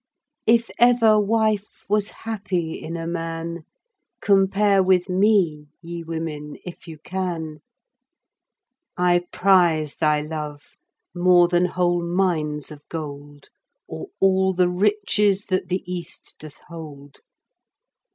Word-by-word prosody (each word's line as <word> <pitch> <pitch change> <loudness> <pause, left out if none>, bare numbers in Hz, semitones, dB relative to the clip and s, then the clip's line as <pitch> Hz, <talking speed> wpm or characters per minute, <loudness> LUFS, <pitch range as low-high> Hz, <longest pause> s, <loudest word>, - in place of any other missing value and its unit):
If 230 +1 +3
ever 235 -3 +5
wife 215 -1 0
was 205 0 +1
happy 190 -7 -4
in 165 +1 -6
a 165 - -5
man, 165 -1 -4 0.5
Compare 195 0 +3
with 185 0 +2
me, 180 -6 +2
ye 170 0 -7
women, 160 -2 -5
if 180 0 -10
you 160 -1 -9
can. 165 -3 -4 1.4
I 175 0 +2
prize 175 -6 +3
thy 150 -2 +2
love 150 -1 -7 0.4
more 175 -1 +5
than 175 0 +2
whole 175 -1 0
Mines 170 -5 -1
of 145 -1 -11
gold 145 -2 -8 0.4
Or 80 0 -7
all 190 0 +3
the 180 0 +2
riches 205 +1 +1
that 185 -1 0
the 185 +1 -1
East 175 -2 -7
doth 155 -1 -11
hold. 145 -4 -11
175 Hz, 115 wpm, -23 LUFS, 160-195 Hz, 1.4 s, ever